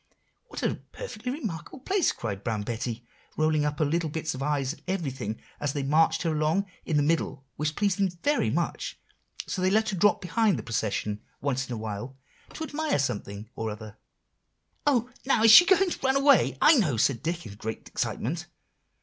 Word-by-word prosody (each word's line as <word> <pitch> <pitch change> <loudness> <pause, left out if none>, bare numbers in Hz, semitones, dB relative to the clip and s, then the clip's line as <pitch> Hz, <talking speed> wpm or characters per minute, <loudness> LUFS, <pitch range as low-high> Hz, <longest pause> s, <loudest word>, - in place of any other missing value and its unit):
"'What - - -7
a - - -1
perfectly 250 - -5
remarkable 225 - -5
place,' 380 +3 +2
cried 100 -4 -5
Brown 110 -2 -1
Betty, 120 +1 -4 0.3
rolling 155 -1 +2
up 150 0 -1
her 155 - +2
little 165 +2 0
bits 160 +1 -3
of 130 - -6
eyes 140 -1 0
at - - -17
everything 135 - -3 0.2
as 145 -1 -1
they 145 - -2
marched 160 +4 +3
her 165 - +1
along 155 +6 +1 0.2
in 155 - +1
the 145 - +3
middle, 150 -3 0
which 150 +1 -2
pleased 205 -1 +1
them 195 -1 +3
very 290 +1 +2
much; - - -2 0.5
so 185 - -3
they 185 - +3
let 220 +2 +2
her 200 - -2
drop 205 +3 +4
behind 205 +3 +1
the - - -5
procession 105 -2 -2 0.2
once 130 -2 -1
in - - -3
a - - -3
while 110 +4 -5 0.4
to 320 - -4
admire 315 0 -1
something 105 -6 -3
or 110 -1 -3
other." 105 0 -8 0.9
"Oh! 250 -3 +2
now 245 -4 +3
she 230 +10 +10
is - - -1
going 390 -2 +1
to - - -4
run 265 0 +2
away, 275 -1 +4
I 305 -1 +7
know," 155 - +2
said 120 +2 +2
Dick 170 +2 -3
in 100 - -8
great 110 +2 -6
excitement. - - -3
155 Hz, 195 wpm, -27 LUFS, -, 0.9 s, she